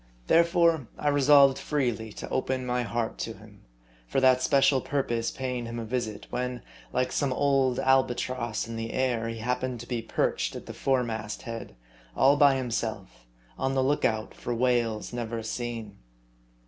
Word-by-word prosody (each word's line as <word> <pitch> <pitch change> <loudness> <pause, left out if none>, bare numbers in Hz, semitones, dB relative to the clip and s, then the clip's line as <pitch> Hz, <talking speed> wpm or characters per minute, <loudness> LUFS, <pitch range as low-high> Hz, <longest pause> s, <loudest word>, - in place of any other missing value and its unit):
Therefore 170 -4 +3
I 150 - 0
resolved 140 -1 +6
freely 120 -7 -1
to - - -7
open 130 -1 -1
my 125 0 0
heart 115 0 -3
to - - -3
him; - - -16 0.5
for 135 - +1
that 130 -1 +5
special 135 0 +4
purpose 120 -5 -1
paying 125 -3 -4
him 115 0 -5
a 115 - -4
visit, 110 -2 -3
when, 125 0 -3 0.3
like 125 0 0
some 140 -3 0
old 135 -2 +2
albatross 125 -3 +1
in 115 0 -6
the 115 0 -4
air, 120 -3 0
he 115 - -5
happened 125 +2 -2
to 120 - -10
be 120 -2 -2
perched - - -1
at - - -7
the - - -7
fore 130 -2 +1
mast 110 -3 -5
head, 115 - -7 0.4
all 135 +2 +5
by 145 -2 +5
himself, 110 - -4 0.3
on 135 0 0
tfie 130 -1 +2
lookout 115 -6 0
for 120 - -4
whales 120 -2 0
never 115 -1 -3
seen. 115 -3 -5
125 Hz, 165 wpm, -27 LUFS, 115-135 Hz, 0.5 s, resolved